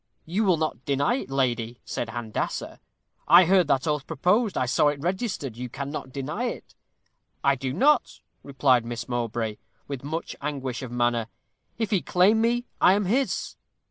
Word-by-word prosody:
'You 195 Hz, +7 st, 0 dB
will 180 Hz, -4 st, +4 dB
not 155 Hz, -5 st, -2 dB
deny 140 Hz, -, +1 dB
it, -, -, -6 dB
lady,' 120 Hz, -3 st, -1 dB
said 120 Hz, -, -3 dB
Handassah. 115 Hz, -2 st, -4 dB, 0.5 s
'I 180 Hz, -, +8 dB
heard 185 Hz, -2 st, +4 dB
that 135 Hz, -1 st, +2 dB
oath 150 Hz, -2 st, -1 dB
proposed. 185 Hz, -, +1 dB
I 130 Hz, -, +1 dB
saw 130 Hz, +4 st, +3 dB
it 145 Hz, -1 st, 0 dB
registered. 180 Hz, -, -2 dB
You 125 Hz, +1 st, -6 dB
cannot 140 Hz, +1 st, -6 dB
deny 145 Hz, -, -3 dB
it.' 245 Hz, -, -6 dB, 0.7 s
'I 140 Hz, -1 st, +4 dB
do 130 Hz, 0 st, -3 dB
not,' 275 Hz, -, +2 dB, 0.2 s
replied 135 Hz, -3 st, +2 dB
Miss 120 Hz, 0 st, -5 dB
Mowbray, 115 Hz, -3 st, -2 dB, 0.3 s
with 140 Hz, -3 st, -5 dB
much 160 Hz, +4 st, -4 dB
anguish 135 Hz, -4 st, -3 dB
of 130 Hz, -3 st, -7 dB
manner; 120 Hz, -2 st, +1 dB, 0.5 s
'if 225 Hz, -1 st, -2 dB
he 195 Hz, -4 st, +2 dB
claim 200 Hz, +5 st, +3 dB
me, 240 Hz, +1 st, +1 dB, 0.2 s
I 185 Hz, -, +7 dB
am 205 Hz, 0 st, +1 dB
his.' 255 Hz, +8 st, -1 dB
140 Hz, 170 wpm, -26 LUFS, 125-185 Hz, 0.7 s, I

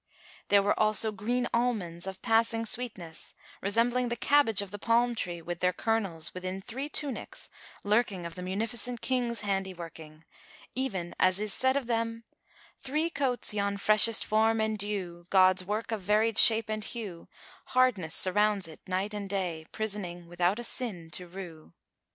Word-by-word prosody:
There 200 Hz, -1 st, +5 dB
were 205 Hz, -, +1 dB
also 215 Hz, +1 st, +4 dB
green 240 Hz, +4 st, -1 dB
almonds 200 Hz, -8 st, -1 dB
of 190 Hz, 0 st, -7 dB
passing 225 Hz, 0 st, +2 dB
sweetness, 210 Hz, -9 st, -4 dB, 0.3 s
resembling 235 Hz, +5 st, +1 dB
the 240 Hz, -, -1 dB
cabbage[FN#398] 280 Hz, -8 st, +3 dB
of 195 Hz, -, -10 dB
the 205 Hz, -, -6 dB
palm 235 Hz, +3 st, +2 dB
tree, 175 Hz, -6 st, -4 dB
with 175 Hz, 0 st, -5 dB
their 180 Hz, 0 st, +2 dB
kernels 195 Hz, -6 st, -1 dB
within 185 Hz, +1 st, -4 dB
three 250 Hz, +8 st, -5 dB
tunics 285 Hz, -4 st, -2 dB, 0.3 s
lurking 205 Hz, -4 st, +1 dB
of 170 Hz, -, -6 dB
the 180 Hz, -, -8 dB
Munificent 225 Hz, +5 st, -3 dB
King's 240 Hz, -3 st, -1 dB
handiworking, 170 Hz, -6 st, -5 dB, 0.5 s
even 195 Hz, -10 st, -2 dB
as 185 Hz, +1 st, +3 dB
is 210 Hz, -1 st, -1 dB
said 260 Hz, +1 st, +2 dB
of 275 Hz, -, -2 dB
them, 230 Hz, -1 st, -2 dB, 0.6 s
"Three 305 Hz, +5 st, -1 dB
coats 260 Hz, -8 st, 0 dB
yon 200 Hz, -1 st, -1 dB
freshest 215 Hz, +2 st, +4 dB
form 220 Hz, +1 st, +2 dB
endue 205 Hz, -5 st, -2 dB
* -, -, -44 dB
God's 185 Hz, -1 st, +5 dB
work 215 Hz, +4 st, -3 dB
of 220 Hz, -3 st, -2 dB
varied 215 Hz, +3 st, +2 dB
shape 225 Hz, -1 st, +7 dB
and 215 Hz, 0 st, -3 dB
hue: 205 Hz, -8 st, -7 dB, 0.4 s
Hardness 235 Hz, -11 st, +2 dB
surrounds 205 Hz, 0 st, +3 dB
it 160 Hz, -, -12 dB
night 190 Hz, +3 st, -2 dB
and 205 Hz, -1 st, -5 dB
day; 175 Hz, -5 st, -3 dB
* -, -, -46 dB
Prisoning 195 Hz, -5 st, -3 dB
without 175 Hz, +3 st, +1 dB
a 240 Hz, -, -5 dB
sin 200 Hz, -10 st, -3 dB
to 180 Hz, +3 st, -4 dB
rue." 170 Hz, -, -10 dB
210 Hz, 165 wpm, -29 LUFS, 185-230 Hz, 0.6 s, shape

